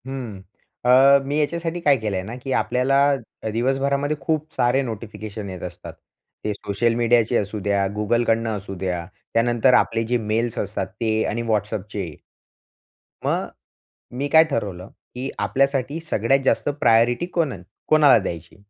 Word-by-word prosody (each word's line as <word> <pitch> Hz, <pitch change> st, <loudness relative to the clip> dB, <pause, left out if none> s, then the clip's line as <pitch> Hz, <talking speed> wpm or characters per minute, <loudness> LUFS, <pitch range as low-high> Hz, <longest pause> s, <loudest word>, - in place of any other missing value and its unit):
हं, 125 Hz, -7 st, -6 dB, 0.4 s
अ, 135 Hz, +3 st, +7 dB
मी 145 Hz, +2 st, -1 dB
याच्यासाठी 170 Hz, +3 st, -1 dB
काय 145 Hz, -5 st, +4 dB
केलंय 105 Hz, -5 st, -2 dB
ना, 110 Hz, +5 st, -7 dB
की 135 Hz, -, -4 dB
आपल्याला 130 Hz, +3 st, +2 dB, 0.4 s
अ, 110 Hz, -, -2 dB
दिवसभरामध्ये 140 Hz, +4 st, 0 dB
खूप 155 Hz, +2 st, -2 dB
सारे 125 Hz, +3 st, +2 dB
नोटिफिकेशन 110 Hz, -3 st, -6 dB
येत 95 Hz, -2 st, -8 dB
असतात. -, -, -8 dB, 0.5 s
ते 105 Hz, -, -1 dB
सोशल 105 Hz, +3 st, -1 dB
मीडियाचे 120 Hz, 0 st, +2 dB
असू 105 Hz, +1 st, -2 dB
द्या, 100 Hz, -1 st, +2 dB
Googleकडनं 115 Hz, 0 st, +1 dB
असू 95 Hz, 0 st, -7 dB
द्या. 90 Hz, -2 st, -2 dB, 0.3 s
त्यानंतर 120 Hz, +2 st, +3 dB
आपले 115 Hz, -1 st, +3 dB
जे 125 Hz, -, +4 dB
मेल्स 110 Hz, +1 st, -1 dB
असतात 100 Hz, +1 st, -3 dB
ते 115 Hz, -1 st, +1 dB, 0.2 s
आणि 115 Hz, -, -2 dB
WhatsAppचे. 105 Hz, -5 st, -2 dB, 1.1 s
मग -, -, 0 dB, 0.7 s
मी 140 Hz, +2 st, -1 dB
काय 160 Hz, +2 st, +7 dB
ठरवलं 95 Hz, -8 st, -3 dB, 0.3 s
की 130 Hz, +2 st, -4 dB
आपल्यासाठी 135 Hz, +2 st, 0 dB
सगळ्यात 135 Hz, -4 st, +1 dB
जास्त -, -, +2 dB
प्रायोरिटी 120 Hz, +4 st, +3 dB
कोण 160 Hz, -6 st, +1 dB, 0.3 s
कोणाला 150 Hz, -5 st, +6 dB
द्यायची? 85 Hz, -4 st, -6 dB
120 Hz, 140 wpm, -22 LUFS, 105-135 Hz, 1.1 s, अ